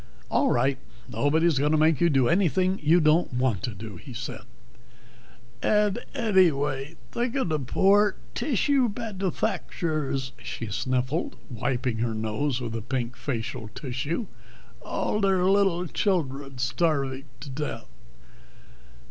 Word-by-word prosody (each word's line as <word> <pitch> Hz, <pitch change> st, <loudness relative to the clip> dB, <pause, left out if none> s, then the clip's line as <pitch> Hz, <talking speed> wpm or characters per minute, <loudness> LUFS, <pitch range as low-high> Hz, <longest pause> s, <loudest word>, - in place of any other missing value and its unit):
"All -, -, +3 dB
right, 135 Hz, -1 st, +2 dB, 0.3 s
nobody's 160 Hz, +1 st, +2 dB
going 150 Hz, +2 st, +2 dB
to -, -, +4 dB
make 155 Hz, -1 st, +3 dB
you 170 Hz, -, +5 dB
do 135 Hz, -5 st, +3 dB
anything 185 Hz, +1 st, +2 dB
you 160 Hz, +4 st, +5 dB
don't 155 Hz, +2 st, +3 dB
want 125 Hz, -6 st, +1 dB, 0.2 s
to," 105 Hz, -4 st, -7 dB
he 130 Hz, +4 st, -10 dB
said. 120 Hz, +1 st, -5 dB, 1.2 s
"Ad 210 Hz, +1 st, +2 dB, 0.2 s
eddyway, 160 Hz, -, +2 dB, 0.2 s
thik 240 Hz, +1 st, -1 dB
of 265 Hz, -10 st, 0 dB
the 155 Hz, -1 st, +1 dB
poor 195 Hz, +9 st, +3 dB, 0.2 s
tissue 270 Hz, -1 st, +2 dB
badufacturers," 170 Hz, -, -2 dB
she 115 Hz, -, -5 dB
sniffled, 130 Hz, -, -1 dB, 0.2 s
wiping 120 Hz, 0 st, -1 dB
her 115 Hz, -1 st, 0 dB
nose 110 Hz, +5 st, -1 dB
with 115 Hz, -2 st, -4 dB
a 115 Hz, -, -3 dB
pink 120 Hz, +1 st, -3 dB
facial 120 Hz, -3 st, -4 dB
tissue. 145 Hz, -, -3 dB, 0.6 s
"All 210 Hz, -, -1 dB
their 190 Hz, -2 st, +3 dB
little 190 Hz, -2 st, +3 dB
childred 140 Hz, -7 st, -1 dB
starvig 135 Hz, 0 st, 0 dB, 0.2 s
to 140 Hz, 0 st, -7 dB
death." 150 Hz, +3 st, -4 dB
150 Hz, 125 wpm, -26 LUFS, 130-185 Hz, 1.2 s, you